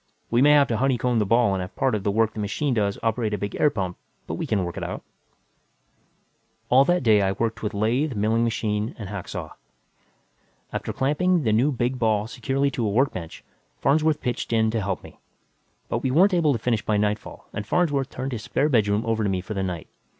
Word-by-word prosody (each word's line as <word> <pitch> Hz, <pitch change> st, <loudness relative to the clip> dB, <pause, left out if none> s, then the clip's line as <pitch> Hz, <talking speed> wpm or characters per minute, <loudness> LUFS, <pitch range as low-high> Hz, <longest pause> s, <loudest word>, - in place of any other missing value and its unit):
We 120 Hz, +1 st, +3 dB
may 145 Hz, +2 st, +6 dB
have 145 Hz, -1 st, +5 dB
to 115 Hz, -, 0 dB
honeycomb 125 Hz, -2 st, +1 dB
the 105 Hz, -, 0 dB
ball 115 Hz, -2 st, +3 dB
and 95 Hz, -, -1 dB
have 90 Hz, +2 st, -7 dB
part 130 Hz, -, +1 dB
of 105 Hz, -3 st, -1 dB
the 100 Hz, -, +1 dB
work 110 Hz, +2 st, +1 dB
the -, -, -7 dB
machine 125 Hz, +7 st, -1 dB
does 100 Hz, -3 st, 0 dB
operate 110 Hz, -1 st, 0 dB
a -, -, -4 dB
big 100 Hz, 0 st, -4 dB
hot -, -, -4 dB
air 150 Hz, -, +6 dB
pump; 95 Hz, -7 st, -4 dB, 0.3 s
but -, -, -5 dB
we -, -, -3 dB
can 100 Hz, -3 st, +1 dB
work 85 Hz, -1 st, -5 dB
it -, -, -5 dB
out." -, -, -5 dB, 1.7 s
All 130 Hz, +2 st, +6 dB
that 175 Hz, +1 st, +2 dB
day, 110 Hz, -3 st, +5 dB
I 95 Hz, 0 st, +1 dB
worked 115 Hz, +2 st, -2 dB
with 105 Hz, -2 st, -3 dB
lathe, 120 Hz, +7 st, 0 dB
milling 110 Hz, +3 st, +1 dB
machine 110 Hz, -1 st, -1 dB
and 105 Hz, -4 st, -7 dB
hacksaw. 100 Hz, -3 st, -6 dB, 1.2 s
After -, -, -3 dB
clamping 165 Hz, +5 st, +1 dB
the 110 Hz, -3 st, +2 dB
new 125 Hz, +7 st, +3 dB
big 125 Hz, 0 st, -1 dB
ball 110 Hz, -2 st, +2 dB
securely 135 Hz, +5 st, -1 dB
to 120 Hz, -4 st, -1 dB
a -, -, 0 dB
workbench, 100 Hz, -, -1 dB, 0.4 s
Farnsworth 155 Hz, +1 st, +2 dB
pitched 125 Hz, -1 st, -3 dB
in 110 Hz, -1 st, +2 dB
to 115 Hz, -1 st, -1 dB
help 95 Hz, -1 st, -3 dB
me. -, -, -14 dB, 0.7 s
But -, -, -1 dB
we 130 Hz, -, 0 dB
weren't 185 Hz, +9 st, +4 dB
able 165 Hz, -4 st, +3 dB
to 130 Hz, -, +1 dB
finish 115 Hz, -1 st, -1 dB
by 105 Hz, -, +1 dB
nightfall 105 Hz, +1 st, -2 dB
and 105 Hz, 0 st, -5 dB
Farnsworth 145 Hz, -6 st, +1 dB
turned 130 Hz, +1 st, -5 dB
his 115 Hz, -4 st, -4 dB
spare 145 Hz, +7 st, 0 dB
bedroom 105 Hz, -4 st, +2 dB
over 115 Hz, -1 st, 0 dB
to 100 Hz, -, +1 dB
me 95 Hz, -1 st, 0 dB
for 95 Hz, +4 st, -6 dB
the 95 Hz, -, -2 dB
night. 90 Hz, -4 st, -4 dB
115 Hz, 225 wpm, -24 LUFS, 105-135 Hz, 1.7 s, may